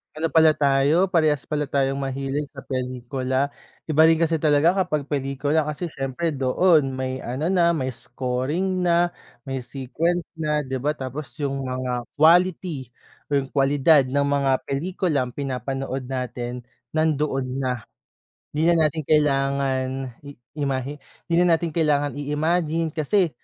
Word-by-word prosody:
Ano 160 Hz, +1 st, 0 dB
pala 160 Hz, 0 st, +5 dB
tayo, 145 Hz, +5 st, +3 dB
parehas 155 Hz, -6 st, +1 dB
pala 150 Hz, -1 st, -1 dB
tayong 135 Hz, -1 st, 0 dB
mahilig 135 Hz, +1 st, -2 dB
sa 140 Hz, -, -10 dB
pelikula. 130 Hz, +1 st, -2 dB, 0.4 s
Iba 155 Hz, 0 st, +4 dB
rin 160 Hz, 0 st, +5 dB
kasi 165 Hz, -1 st, +2 dB
talaga 155 Hz, +4 st, +4 dB
kapag 150 Hz, -5 st, -2 dB
pelikula 145 Hz, +2 st, 0 dB
kasi 150 Hz, +4 st, -4 dB
siyempre 145 Hz, +2 st, -3 dB
doon 135 Hz, +2 st, +3 dB
may 130 Hz, 0 st, -4 dB
ano 130 Hz, +7 st, -2 dB
na, 175 Hz, -2 st, +3 dB
may 135 Hz, -6 st, -1 dB
scoring 145 Hz, +10 st, -2 dB
na, 175 Hz, 0 st, +3 dB, 0.4 s
may 135 Hz, -2 st, -3 dB
sequence 155 Hz, +7 st, -2 dB
na 150 Hz, -3 st, -1 dB
di 130 Hz, -, -3 dB
ba. 135 Hz, +3 st, 0 dB
Tapos 135 Hz, -1 st, -6 dB
yung 140 Hz, -2 st, -2 dB
mga 130 Hz, -1 st, -3 dB, 0.2 s
quality 165 Hz, -5 st, +3 dB, 0.4 s
o 140 Hz, -, +4 dB
yung 135 Hz, -, -5 dB
kwalidad 140 Hz, +2 st, +4 dB
ng 140 Hz, +2 st, 0 dB
mga 140 Hz, -1 st, +2 dB, 0.2 s
pelikulang 140 Hz, -3 st, -1 dB
pinapanood 135 Hz, 0 st, -3 dB
natin 125 Hz, -1 st, -4 dB, 0.3 s
nandoon 150 Hz, -4 st, 0 dB, 0.2 s
na 125 Hz, -4 st, -3 dB, 0.6 s
hindi 160 Hz, +3 st, +2 dB
na 160 Hz, -2 st, +4 dB
natin 155 Hz, +1 st, -5 dB
kailangan 135 Hz, -3 st, +1 dB
i 145 Hz, -, -8 dB, 0.2 s
imahe 140 Hz, 0 st, -2 dB, 0.3 s
di 170 Hz, -, 0 dB
na 175 Hz, -, +5 dB
natin 165 Hz, +1 st, +1 dB
kailangan 150 Hz, -3 st, +1 dB
i-imagine 160 Hz, +3 st, 0 dB
kasi 165 Hz, +5 st, +1 dB
145 Hz, 140 wpm, -23 LUFS, 135-160 Hz, 0.6 s, pala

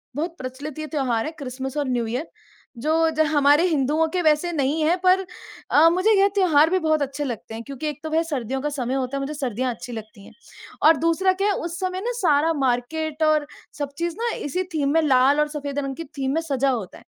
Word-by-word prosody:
बहुत 330 Hz, +4 st, -3 dB
प्रचलित 265 Hz, +3 st, -7 dB
ये 310 Hz, -, -4 dB
त्योहार 260 Hz, -7 st, -1 dB
है, 315 Hz, -, -3 dB
क्रिस्मस 265 Hz, +1 st, -5 dB
और 290 Hz, -, 0 dB
न्यू 240 Hz, -2 st, 0 dB
ईयर, 250 Hz, +8 st, -3 dB, 0.5 s
जो 320 Hz, +5 st, +2 dB
ज -, -, +4 dB
हमारे 290 Hz, +3 st, +5 dB
हिन्दुओं 310 Hz, +1 st, +1 dB
के 360 Hz, -, +1 dB
वैसे 310 Hz, +2 st, +2 dB
नहीं 295 Hz, +2 st, 0 dB
हैं, 335 Hz, +4 st, +3 dB
पर 375 Hz, +1 st, +4 dB, 0.5 s
अ, 320 Hz, +3 st, +7 dB
मुझे 370 Hz, +5 st, +2 dB
ये 400 Hz, -, +6 dB
त्योहार 320 Hz, -5 st, +4 dB
भी 375 Hz, +2 st, +2 dB
बहुत 315 Hz, -2 st, +1 dB
अच्छे 280 Hz, +1 st, -2 dB
लगते 225 Hz, -3 st, -6 dB
हैं, 230 Hz, -, -6 dB
क्योंकि 280 Hz, +3 st, -6 dB
एक 300 Hz, -1 st, -7 dB
तो 315 Hz, -, -4 dB
वह 325 Hz, +1 st, +2 dB
सर्दियों 265 Hz, -5 st, -3 dB
का 295 Hz, -, -1 dB
समय 260 Hz, -3 st, -3 dB
होता 265 Hz, +1 st, -2 dB
है, -, -, -3 dB
मुझे 275 Hz, +2 st, -4 dB
सर्दियाँ 255 Hz, -3 st, -2 dB
अच्छी 245 Hz, -, -9 dB
लगती 215 Hz, -3 st, -9 dB
हैं। -, -, -14 dB, 0.6 s
और 320 Hz, -1 st, +6 dB
दूसरा 335 Hz, +4 st, +2 dB
क्या 395 Hz, +2 st, 0 dB
है, -, -, +2 dB
उस 340 Hz, -2 st, -4 dB
समय 370 Hz, 0 st, -2 dB
ना, 480 Hz, +4 st, -2 dB
सारा 325 Hz, -5 st, +3 dB
मार्केट 305 Hz, +6 st, -1 dB
और 305 Hz, -1 st, +2 dB, 0.3 s
सब 285 Hz, -1 st, -3 dB
चीज़ 340 Hz, -1 st, -2 dB
ना, 470 Hz, 0 st, 0 dB
इसी 360 Hz, +6 st, -2 dB
थीम 280 Hz, -2 st, +1 dB
में, 325 Hz, -, +4 dB
लाल 275 Hz, -1 st, +4 dB
और 300 Hz, -, +2 dB
सफेद 285 Hz, -1 st, -3 dB
रंग 275 Hz, -1 st, -3 dB
की 330 Hz, -, -5 dB
थीम 270 Hz, 0 st, -1 dB
में 325 Hz, -, +1 dB
सजा 275 Hz, -4 st, 0 dB
होता 225 Hz, -8 st, -3 dB
है। -, -, -20 dB
295 Hz, 235 wpm, -23 LUFS, 265-325 Hz, 0.6 s, अ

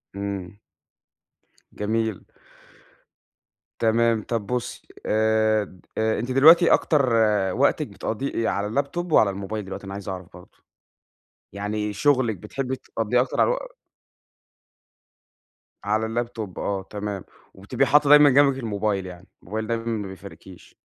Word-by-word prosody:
إمم. 100 Hz, -1 st, -5 dB, 1.2 s
جميل. 110 Hz, 0 st, -2 dB, 1.6 s
تمام. 115 Hz, -1 st, +2 dB
طَب 115 Hz, -4 st, -3 dB
بُصّي 125 Hz, 0 st, -4 dB, 0.2 s
آآ 110 Hz, 0 st, +2 dB
د 95 Hz, -2 st, -14 dB, 0.2 s
آآ، 110 Hz, 0 st, +1 dB
أنتِ 120 Hz, +3 st, -3 dB
دلوقتي 165 Hz, +6 st, +7 dB
أكتر 140 Hz, -5 st, +2 dB, 0.4 s
وقتِك -, -, +1 dB
بتقضّيه 125 Hz, +5 st, -4 dB
إيه، 115 Hz, -, -1 dB
يا -, -, +1 dB
على 100 Hz, +1 st, -2 dB
الlaptop 175 Hz, +4 st, -6 dB
وعلى 105 Hz, -8 st, +5 dB
الmobile 100 Hz, +2 st, -6 dB
دلوقتي، 95 Hz, +1 st, -8 dB
أنا 95 Hz, -, -7 dB
عايز 100 Hz, 0 st, -7 dB
أعرَف 90 Hz, -2 st, -6 dB
برضه. 90 Hz, 0 st, -16 dB, 1.0 s
يعني 105 Hz, +1 st, -3 dB
شغلِك 130 Hz, -4 st, +1 dB
بتحبي 130 Hz, +7 st, -4 dB
تقضّيه 120 Hz, -1 st, -1 dB
أكتر 125 Hz, -, -1 dB
على -, -, +4 dB
الو -, -, 0 dB, 2.3 s
على 110 Hz, +2 st, 0 dB
الlaptop 115 Hz, -4 st, -4 dB
آه 100 Hz, -1 st, -2 dB
تمام، 105 Hz, -2 st, -5 dB, 0.3 s
وبتبقي 100 Hz, +7 st, -1 dB
حاطّة 145 Hz, +1 st, +4 dB
دايمًا 150 Hz, 0 st, +8 dB
جنبِك 140 Hz, 0 st, +4 dB
الmobile 100 Hz, -3 st, -1 dB
يعني، 90 Hz, +1 st, -11 dB, 0.2 s
الmobile 110 Hz, -, -4 dB
دايمًا 115 Hz, 0 st, -3 dB
ما 110 Hz, -4 st, -3 dB
بيفارقكيش. 90 Hz, -1 st, -13 dB
110 Hz, 130 wpm, -24 LUFS, 100-125 Hz, 2.3 s, دايمًا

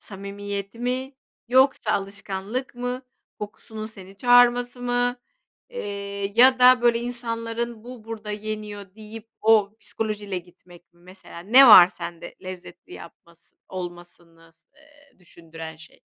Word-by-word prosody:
samimiyeti 200 Hz, +1 st, -7 dB
mi, 255 Hz, +2 st, -3 dB, 0.3 s
yoksa 260 Hz, -3 st, +3 dB
alışkanlık 195 Hz, +5 st, -4 dB
mı, 245 Hz, +1 st, -4 dB, 0.4 s
kokusunun 215 Hz, +1 st, -8 dB
seni 195 Hz, -3 st, -13 dB
çağırması 245 Hz, +1 st, +4 dB
mı, 245 Hz, 0 st, 0 dB, 0.5 s
eee, 200 Hz, -, -5 dB
ya 255 Hz, +2 st, +6 dB
da, 250 Hz, 0 st, +6 dB
böyle,, 235 Hz, -1 st, +4 dB
insanların 235 Hz, -1 st, -5 dB
bu 245 Hz, -3 st, -11 dB
burada 220 Hz, -1 st, -7 dB
yeniyor 210 Hz, -2 st, -6 dB
deyip 220 Hz, +1 st, -11 dB
o 215 Hz, -1 st, +3 dB
psikolojiyle 205 Hz, -3 st, -4 dB
gitmek 175 Hz, 0 st, -19 dB
mi 175 Hz, -, -28 dB
mesela, 185 Hz, -1 st, -14 dB
ne 250 Hz, +9 st, +7 dB
var 185 Hz, -5 st, +10 dB
sende 170 Hz, -1 st, -8 dB
lezzetli 185 Hz, -1 st, -10 dB
yapmasını 170 Hz, 0 st, -15 dB
olmasını 175 Hz, -2 st, -10 dB
s -, -, -37 dB
eee, 290 Hz, -2 st, -24 dB
düşündüren 165 Hz, -2 st, -11 dB
şey? 160 Hz, -, -17 dB
210 Hz, 125 wpm, -24 LUFS, 185-245 Hz, 0.5 s, var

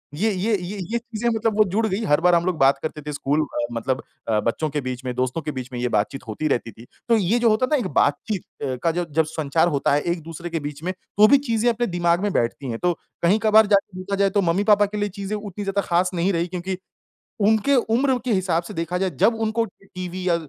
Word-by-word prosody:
ये-ये, 210 Hz, +3 st, 0 dB
ये-ये 190 Hz, +4 st, -4 dB
चीज़ें 235 Hz, 0 st, -3 dB
मतलब 220 Hz, -1 st, 0 dB
वो 215 Hz, -, +7 dB
जुड़ 220 Hz, +3 st, +1 dB
गई 205 Hz, +3 st, -2 dB
हर 150 Hz, -3 st, +3 dB
बार 180 Hz, 0 st, +5 dB
हम 170 Hz, +1 st, +2 dB
लोग 180 Hz, -3 st, 0 dB
बात 135 Hz, +1 st, +5 dB
करते 155 Hz, -1 st, -4 dB
थे 150 Hz, 0 st, -6 dB
स्कूल 145 Hz, +2 st, 0 dB, 0.3 s
मतलब 130 Hz, +3 st, -2 dB, 0.2 s
अ, 110 Hz, -1 st, +2 dB
बच्चों 120 Hz, +8 st, -1 dB
के 145 Hz, 0 st, -2 dB
बीच 130 Hz, 0 st, -5 dB
में 125 Hz, -, -2 dB
दोस्तों 130 Hz, +5 st, -1 dB
के 150 Hz, -, -4 dB
बीच 130 Hz, -2 st, -6 dB
में 120 Hz, -, -4 dB
ये 125 Hz, -, 0 dB
बातचीत 120 Hz, +4 st, -1 dB
होती 110 Hz, +8 st, -2 dB
रहती 120 Hz, -5 st, -1 dB
थी, 115 Hz, +4 st, -14 dB, 0.2 s
तो 230 Hz, -, +5 dB
ये 210 Hz, +4 st, +2 dB
जो 235 Hz, -1 st, +4 dB
होता 215 Hz, +4 st, +3 dB
था -, -, +5 dB
एक 220 Hz, -7 st, -2 dB
बातचीत 165 Hz, +7 st, 0 dB, 0.2 s
अ, 130 Hz, -2 st, -1 dB
का 165 Hz, -, +3 dB
जो 175 Hz, +1 st, -2 dB
जब 160 Hz, +2 st, +2 dB
संचार 160 Hz, +1 st, 0 dB
होता 140 Hz, -2 st, +1 dB
है 145 Hz, -, +2 dB
एक-दूसरे 170 Hz, 0 st, -4 dB
के 165 Hz, -1 st, -2 dB
बीच 145 Hz, +1 st, -7 dB
में 185 Hz, +2 st, -2 dB, 0.2 s
तो 210 Hz, +1 st, +8 dB
भी 280 Hz, -, +7 dB
चीज़ें 240 Hz, -4 st, +1 dB
अपने 240 Hz, +1 st, 0 dB
दिमाग़ 175 Hz, 0 st, +1 dB
में 205 Hz, -1 st, 0 dB
बैठती 125 Hz, +3 st, -1 dB
है। 115 Hz, -, -3 dB
तो 175 Hz, +4 st, +1 dB, 0.3 s
कहीं-कभार 215 Hz, +4 st, +5 dB
जाके 200 Hz, -2 st, +1 dB
देखा 200 Hz, +2 st, -3 dB
जाए 200 Hz, 0 st, +3 dB
तो 200 Hz, +1 st, +1 dB
मम्मी-पापा 205 Hz, +4 st, +3 dB
के 210 Hz, +1 st, -6 dB
लिए 205 Hz, 0 st, -1 dB
चीज़ें 200 Hz, +2 st, -3 dB
उतनी 205 Hz, -1 st, -6 dB
ज़्यादा 200 Hz, 0 st, 0 dB
ख़ास 180 Hz, +1 st, +2 dB
नहीं 180 Hz, +3 st, +1 dB
रही 170 Hz, 0 st, 0 dB
क्योंकि 180 Hz, +1 st, -4 dB, 0.7 s
उनके 220 Hz, +6 st, +3 dB, 0.2 s
उम्र 265 Hz, +1 st, +3 dB
के 245 Hz, -, 0 dB
हिसाब 180 Hz, -3 st, +1 dB
से 210 Hz, -, -9 dB
देखा 165 Hz, +1 st, -2 dB
जाए 190 Hz, 0 st, 0 dB
जब 230 Hz, -, +5 dB
उनको 225 Hz, +1 st, +1 dB
टीवी 185 Hz, -1 st, -7 dB
या 170 Hz, -, +4 dB
180 Hz, 245 wpm, -23 LUFS, 155-210 Hz, 0.7 s, तो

